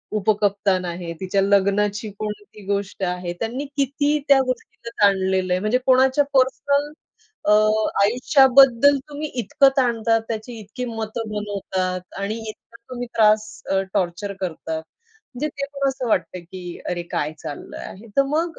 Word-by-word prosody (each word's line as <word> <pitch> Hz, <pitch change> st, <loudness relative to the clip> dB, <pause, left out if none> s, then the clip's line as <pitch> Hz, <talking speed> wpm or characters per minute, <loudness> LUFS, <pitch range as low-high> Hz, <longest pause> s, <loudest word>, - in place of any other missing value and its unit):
उपकप्तान 200 Hz, -2 st, +1 dB
आहे, 170 Hz, -1 st, -5 dB
तिच्या 195 Hz, +1 st, 0 dB
लग्नाची 200 Hz, +2 st, +2 dB
कोणती 210 Hz, 0 st, -6 dB
गोष्ट 200 Hz, -1 st, -2 dB
आहे, 180 Hz, -1 st, -2 dB
त्यांनी 240 Hz, +5 st, -3 dB
किती 285 Hz, +2 st, +1 dB
त्या 275 Hz, -1 st, +6 dB
गोष्टीला 245 Hz, -2 st, -5 dB
ताणलेलं 190 Hz, -2 st, +3 dB
आहे. 180 Hz, -, +1 dB
म्हणजे 215 Hz, +4 st, +2 dB
कोणाच्या 260 Hz, +2 st, +4 dB
पर्सनल 280 Hz, +2 st, +2 dB, 0.6 s
अ, -, -, +6 dB, 0.5 s
आयुष्याबद्दल 265 Hz, +3 st, +5 dB
तुम्ही 295 Hz, +1 st, -4 dB
इतकं 255 Hz, +5 st, +4 dB
ताणतात, 230 Hz, -3 st, +2 dB
त्याची 225 Hz, +1 st, -5 dB
इतकी 215 Hz, +5 st, -6 dB
मतं 225 Hz, -1 st, -4 dB
बनवतात 195 Hz, -3 st, -3 dB, 0.2 s
आणि 200 Hz, +2 st, -2 dB
इतका 215 Hz, -, -13 dB
तुम्ही 245 Hz, -1 st, -5 dB
त्रास 215 Hz, -1 st, +5 dB, 0.3 s
अ, 195 Hz, 0 st, +3 dB
टॉर्चर 180 Hz, +3 st, -1 dB
करतात. 160 Hz, -3 st, -3 dB, 0.6 s
म्हणजे 300 Hz, +5 st, -2 dB
ते 280 Hz, -1 st, -4 dB
पण 275 Hz, 0 st, +1 dB
असं 265 Hz, -2 st, -3 dB
वाटतं 180 Hz, -3 st, 0 dB
की 180 Hz, +2 st, -11 dB, 0.3 s
अरे, 175 Hz, -1 st, -2 dB
काय 155 Hz, -3 st, -3 dB
चाललंय 145 Hz, -, -8 dB
आहे 210 Hz, +5 st, -11 dB
तर 275 Hz, -, +6 dB
मग 325 Hz, +4 st, -1 dB
215 Hz, 140 wpm, -22 LUFS, 190-260 Hz, 0.6 s, त्या